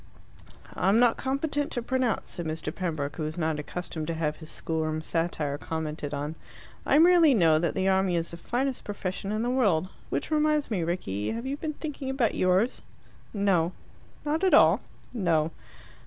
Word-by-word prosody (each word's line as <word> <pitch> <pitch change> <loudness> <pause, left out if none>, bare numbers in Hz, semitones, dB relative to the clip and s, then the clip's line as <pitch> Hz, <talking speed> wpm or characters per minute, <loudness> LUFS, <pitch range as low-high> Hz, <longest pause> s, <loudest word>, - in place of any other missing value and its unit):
"I 185 - +1
am 205 - +5
not 240 -1 +5
competent 285 +2 -1
to 245 - -1
pronounce," 255 -3 -1
said 170 -2 -4
Mr. 155 -1 -3
Pembroke, 155 -6 -3
who - - -4
was 155 +2 -4
not 160 -2 0
accustomed 160 0 -5
to 165 - -2
have 155 -2 -1
his 160 -1 -10
schoolroom 155 -1 -2
satire 160 -4 -1
commented 155 -2 -4
on. 145 +1 -3 0.5
"I - - +5
merely 330 -3 +6
know 165 -6 +5
that 170 0 -1
the 190 0 +1
army 190 -1 +2
is 165 0 -1
the 170 - -7
finest 255 +8 -2
profession 195 -1 -4
in 215 +1 -1
the 245 - 0
world. 195 -9 +2 0.2
Which - - -2
reminds 300 -3 +2
me, 195 -5 0
Rickie 160 - -2
have 230 +2 -5
you 270 +1 -2
been 305 +1 -4
thinking 290 -3 -5
about 265 -4 +1
yours?" 185 +6 +2 0.5
"No." 190 -5 +1 0.5
"Not 310 +4 0
at 375 - +6
all?" - - +6 0.3
"No." 165 -8 +1
185 Hz, 180 wpm, -27 LUFS, 160-255 Hz, 0.5 s, merely